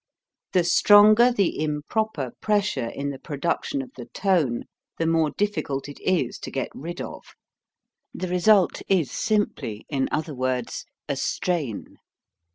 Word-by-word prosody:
The 180 Hz, -, +4 dB
stronger 210 Hz, +6 st, +6 dB
the 200 Hz, -9 st, 0 dB
improper 150 Hz, -, -2 dB
pressure 205 Hz, -, +1 dB
in 140 Hz, +4 st, -4 dB
the 135 Hz, -, -8 dB
production 170 Hz, -, -2 dB
of 255 Hz, -, -13 dB
the -, -, -8 dB
tone, 165 Hz, -, +1 dB, 0.3 s
the 165 Hz, -, 0 dB
more 165 Hz, -1 st, +2 dB
difficult 200 Hz, -10 st, -1 dB
it 145 Hz, -, -10 dB
is 170 Hz, -10 st, 0 dB
to -, -, -6 dB
get 135 Hz, -, -3 dB
rid 170 Hz, +4 st, -7 dB
of. -, -, -7 dB, 0.9 s
The 185 Hz, -, -4 dB
result 180 Hz, +2 st, +3 dB
is 180 Hz, -8 st, +2 dB
simply, 205 Hz, -, -1 dB
in 135 Hz, -3 st, 0 dB
other 155 Hz, 0 st, -2 dB
words, 130 Hz, -2 st, -2 dB, 0.2 s
a -, -, -1 dB
strain. 155 Hz, -, -2 dB
165 Hz, 140 wpm, -24 LUFS, 140-205 Hz, 0.9 s, stronger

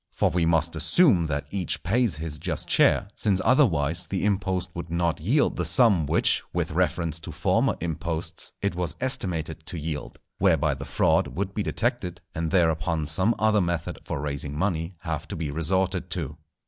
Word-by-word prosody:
For -, -, +1 dB
we 85 Hz, -2 st, +1 dB
must 85 Hz, 0 st, +2 dB
assume 90 Hz, -, +3 dB
that 70 Hz, -2 st, -2 dB
each 95 Hz, -4 st, -2 dB
pays 110 Hz, 0 st, +1 dB
his 75 Hz, -1 st, -5 dB
just -, -, -3 dB
share, -, -, +4 dB
since 100 Hz, -3 st, +1 dB
otherwise 85 Hz, -, +2 dB
the 100 Hz, 0 st, -2 dB
impost 95 Hz, -3 st, 0 dB
would 85 Hz, -1 st, -6 dB
not 85 Hz, -2 st, 0 dB
yield 130 Hz, -, +2 dB
the -, -, 0 dB
sum 100 Hz, -, +4 dB
which, -, -, +3 dB
with -, -, -1 dB
reference 80 Hz, -2 st, 0 dB
to 80 Hz, -, -8 dB
former -, -, +1 dB
imposts, 80 Hz, 0 st, -3 dB
it 100 Hz, -, +1 dB
was 90 Hz, -1 st, -2 dB
estimated 85 Hz, -, -1 dB
to 85 Hz, -, -3 dB
yield; 75 Hz, -1 st, -5 dB, 0.2 s
whereby 80 Hz, -6 st, +3 dB
the 70 Hz, +1 st, -7 dB
fraud 70 Hz, -, +2 dB
would 100 Hz, +1 st, -4 dB
be 105 Hz, -, -2 dB
detected, 100 Hz, -6 st, -2 dB
and 80 Hz, 0 st, -2 dB
thereupon 80 Hz, -2 st, +1 dB
some 95 Hz, +10 st, +2 dB
other 110 Hz, -1 st, +3 dB
method 85 Hz, -2 st, -2 dB
for -, -, -4 dB
raising 70 Hz, 0 st, -4 dB
money 85 Hz, -1 st, -1 dB
have 80 Hz, 0 st, -4 dB
to -, -, -5 dB
be 80 Hz, -3 st, -3 dB
resorted 90 Hz, +3 st, 0 dB
to. 80 Hz, -4 st, -4 dB
85 Hz, 175 wpm, -26 LUFS, 80-95 Hz, 0.2 s, share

